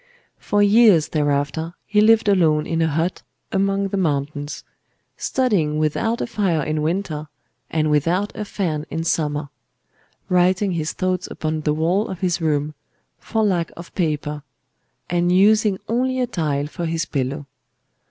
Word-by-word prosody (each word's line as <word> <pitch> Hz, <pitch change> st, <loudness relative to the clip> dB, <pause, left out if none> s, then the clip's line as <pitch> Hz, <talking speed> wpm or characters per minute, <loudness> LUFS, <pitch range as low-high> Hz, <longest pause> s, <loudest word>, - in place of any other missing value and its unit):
For 205 Hz, 0 st, +1 dB
years 205 Hz, -6 st, +5 dB
thereafter 145 Hz, +2 st, -1 dB
he 210 Hz, 0 st, +2 dB
lived 225 Hz, 0 st, +5 dB
alone 160 Hz, -6 st, +3 dB
in 165 Hz, 0 st, -1 dB
a 160 Hz, -, +3 dB
hut 165 Hz, +4 st, -1 dB, 0.3 s
among 195 Hz, 0 st, +1 dB
the 200 Hz, -, -2 dB
mountains; 145 Hz, -3 st, -2 dB, 0.5 s
studying 195 Hz, -, 0 dB
without 155 Hz, +10 st, 0 dB
a -, -, 0 dB
fire 185 Hz, -9 st, 0 dB
in 155 Hz, +1 st, -1 dB
winter, 155 Hz, -2 st, -2 dB, 0.4 s
and 155 Hz, -1 st, 0 dB
without 170 Hz, +7 st, +1 dB
a 215 Hz, -, -3 dB
fan 160 Hz, -7 st, -3 dB
in 165 Hz, +1 st, -3 dB
summer; 150 Hz, -3 st, -1 dB, 0.8 s
writing 185 Hz, +2 st, +2 dB
his 165 Hz, -2 st, -2 dB
thoughts 185 Hz, -1 st, -1 dB
upon 155 Hz, 0 st, -3 dB
the 150 Hz, -1 st, +1 dB
wall 175 Hz, +7 st, +1 dB
of 185 Hz, -, -7 dB
his 180 Hz, -2 st, 0 dB
room—for 155 Hz, +8 st, -3 dB
lack 180 Hz, -5 st, 0 dB
of 170 Hz, 0 st, -10 dB
paper;—and 150 Hz, 0 st, -3 dB
using 205 Hz, +2 st, +4 dB
only 255 Hz, +3 st, 0 dB
a 250 Hz, -, +2 dB
tile 150 Hz, -11 st, -1 dB
for 170 Hz, +3 st, -4 dB
his 165 Hz, +1 st, -1 dB
pillow. 140 Hz, +1 st, -3 dB
165 Hz, 145 wpm, -21 LUFS, 150-195 Hz, 0.8 s, years